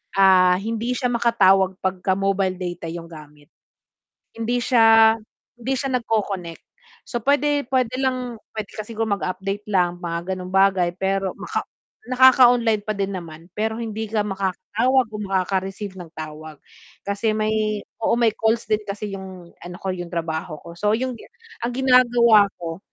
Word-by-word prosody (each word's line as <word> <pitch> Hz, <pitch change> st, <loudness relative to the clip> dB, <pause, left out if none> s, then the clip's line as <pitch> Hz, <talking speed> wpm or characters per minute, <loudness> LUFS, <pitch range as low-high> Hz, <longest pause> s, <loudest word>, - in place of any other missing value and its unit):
ah, 185 Hz, -2 st, +6 dB
hindi 230 Hz, +4 st, -3 dB
siya 250 Hz, -2 st, -1 dB
makatawag 195 Hz, -5 st, +3 dB
pagka-mobile 190 Hz, 0 st, 0 dB
data 175 Hz, -2 st, -5 dB
yung 170 Hz, 0 st, -7 dB
gamit. 150 Hz, -2 st, -14 dB, 0.9 s
Hindi 240 Hz, +2 st, -1 dB
siya 225 Hz, -2 st, +6 dB, 0.4 s
hindi 250 Hz, +3 st, -3 dB
siya 270 Hz, +1 st, -2 dB
nagko-connect. 195 Hz, -7 st, -3 dB, 0.5 s
So, 240 Hz, -, -2 dB
puwede 285 Hz, -1 st, +2 dB
pwede 255 Hz, -2 st, +1 dB
lang 255 Hz, -3 st, -2 dB, 0.2 s
pwede 215 Hz, -2 st, -5 dB
ka 215 Hz, -, -3 dB
sigurong 220 Hz, -2 st, -1 dB
mag-update 195 Hz, +3 st, -4 dB
lang 175 Hz, -2 st, +1 dB
mga 170 Hz, +1 st, -4 dB
gano'ng 185 Hz, 0 st, -8 dB
bagay, 190 Hz, -2 st, +4 dB
pero 195 Hz, 0 st, -1 dB
maka -, -, -4 dB, 0.4 s
nakaka-online 245 Hz, -4 st, +5 dB
pa 215 Hz, -, -1 dB
din 200 Hz, 0 st, -2 dB
naman. 170 Hz, -2 st, -8 dB
Pero 220 Hz, +4 st, -2 dB
hindi 220 Hz, 0 st, -4 dB
ka 215 Hz, 0 st, 0 dB
makakatawag 210 Hz, +6 st, 0 dB
o 210 Hz, -, -6 dB
makaka-receive 190 Hz, +1 st, -2 dB
ng 175 Hz, -, -8 dB
tawag 155 Hz, 0 st, -8 dB, 0.5 s
kasi 200 Hz, +2 st, -1 dB
may 215 Hz, -1 st, 0 dB, 0.2 s
oo, 225 Hz, -, +1 dB
may 230 Hz, -2 st, +4 dB
calls 225 Hz, +1 st, +1 dB
din 215 Hz, -, +3 dB
kasi 205 Hz, 0 st, -5 dB
yung 185 Hz, -2 st, -10 dB
ano 175 Hz, +1 st, -9 dB
ko, 190 Hz, -, -2 dB
yung 175 Hz, -1 st, -4 dB
trabaho 165 Hz, 0 st, -3 dB
ko. 170 Hz, 0 st, -11 dB
So, 210 Hz, +2 st, +1 dB
yung 255 Hz, +1 st, -2 dB
gi -, -, -13 dB, 0.4 s
ang 240 Hz, -, -1 dB
ginagawa 240 Hz, -5 st, +5 dB
ko, 165 Hz, 0 st, -5 dB
200 Hz, 150 wpm, -22 LUFS, 185-230 Hz, 0.9 s, ah